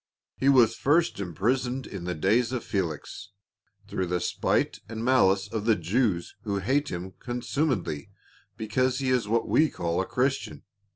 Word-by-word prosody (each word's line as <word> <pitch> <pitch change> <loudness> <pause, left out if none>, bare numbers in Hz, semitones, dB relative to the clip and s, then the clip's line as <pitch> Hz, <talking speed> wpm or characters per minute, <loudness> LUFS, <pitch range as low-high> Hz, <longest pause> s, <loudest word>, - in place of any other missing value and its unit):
He 135 - +2
was 120 -5 +5
first 160 +3 +2
imprisoned 125 +8 -1
in 95 -3 -7
the 90 0 -2
days 110 +9 +2
of 125 -3 -2
Fehx, 90 0 -3 0.6
through 95 - -2
the 90 0 0
spite - - 0
and 115 0 -5
maHce 100 -6 +3
of 110 -2 -2
the 115 -2 +4
Jews 90 0 0
who 100 -2 -2
hate 135 +10 0
him 90 +2 -5
consumedly 120 - -2 0.5
because 130 +4 0
he 130 -1 0
is 125 -4 +1
what 115 +2 +1
we 155 0 +4
call 85 +1 -1
a 95 - -4
Christian. 125 - -1
115 Hz, 160 wpm, -27 LUFS, 95-130 Hz, 0.6 s, was